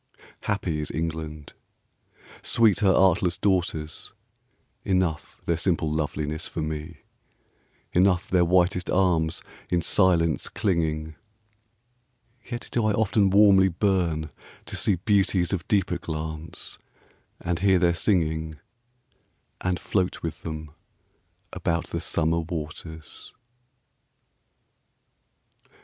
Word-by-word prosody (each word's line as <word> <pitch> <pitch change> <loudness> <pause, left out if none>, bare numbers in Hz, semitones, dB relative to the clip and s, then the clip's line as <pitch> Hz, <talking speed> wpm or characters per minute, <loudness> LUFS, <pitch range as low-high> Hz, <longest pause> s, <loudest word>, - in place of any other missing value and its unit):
Happy 90 -6 -1
is 75 - -5
England, 80 -2 -4 0.9
sweet 110 -4 +3
her 100 -2 +4
artless 90 -1 +3
daughters; 85 -6 -1 0.7
Enough 90 -5 -1
their 85 - +1
simple 85 -2 0
loveliness 75 0 -2
for 80 - -4
me, 75 0 -5 0.9
10 90 - +4
Enough 95 0 +3
their 90 -1 +4
whitest 90 +1 +2
arms 85 -4 +1 0.3
in 90 - +2
silence 85 -3 +2
clinging: 80 -4 -1 1.3
Yet 120 -1 -6
do 120 - +1
I 105 - +2
often 105 -1 +2
warmly 100 -1 +6
burn 85 -5 0 0.3
to - - -6
see 100 - +2
Beauties 95 -1 +1
of 90 -4 -3
deeper 95 -4 +1
glance, 80 -1 -6 0.6
and 85 -1 -2
hear 95 0 +4
their 85 -1 +3
singing, 80 -4 0 1.1
And 90 -1 0
float 95 -3 -1
with 80 -1 -4
them 80 -2 -6 0.8
about 85 0 -2
the - - -2
summer 85 +1 0
waters. 80 -1 -7
85 Hz, 105 wpm, -25 LUFS, 80-95 Hz, 1.3 s, warmly